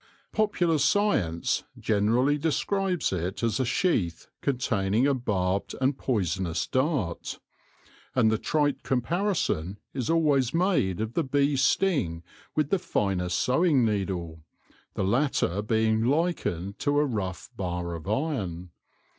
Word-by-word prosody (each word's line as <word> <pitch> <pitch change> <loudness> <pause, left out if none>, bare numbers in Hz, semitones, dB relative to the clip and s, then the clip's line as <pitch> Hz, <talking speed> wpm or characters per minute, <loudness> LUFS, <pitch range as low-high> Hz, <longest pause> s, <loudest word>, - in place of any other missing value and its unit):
Popular 180 -7 +1
science 105 - +1
generally 115 +7 +2
describes 180 - 0
it 90 +4 -3
as 115 +2 +1
a 130 - +1
sheath 115 - 0 0.2
containing 115 -4 +1
a 140 - +3
barbed 100 -6 -1
and 130 +1 +2
poisonous 90 - -1
dart; 130 - -1 0.8
and 115 -4 +4
the 110 - +1
trite 145 -2 0
comparison 130 - -1 0.2
is 130 -4 -3
always 150 -5 +2
made 165 - +1
of 110 +1 -3
the 165 - +1
bee's 140 0 +1
sting 130 - +1 0.3
with 155 -1 0
the 195 - +3
finest 90 - -1
sewing 135 -1 +3
needle, 95 -6 -2 0.5
the - - -1
latter 105 - +1
being 110 +1 +1
likened 120 - -1
to 145 0 +1
a 150 - +4
rough 100 -8 -4
bar 90 -2 -3
of 85 +3 -6
iron. 100 - -2
115 Hz, 125 wpm, -27 LUFS, 95-145 Hz, 0.8 s, and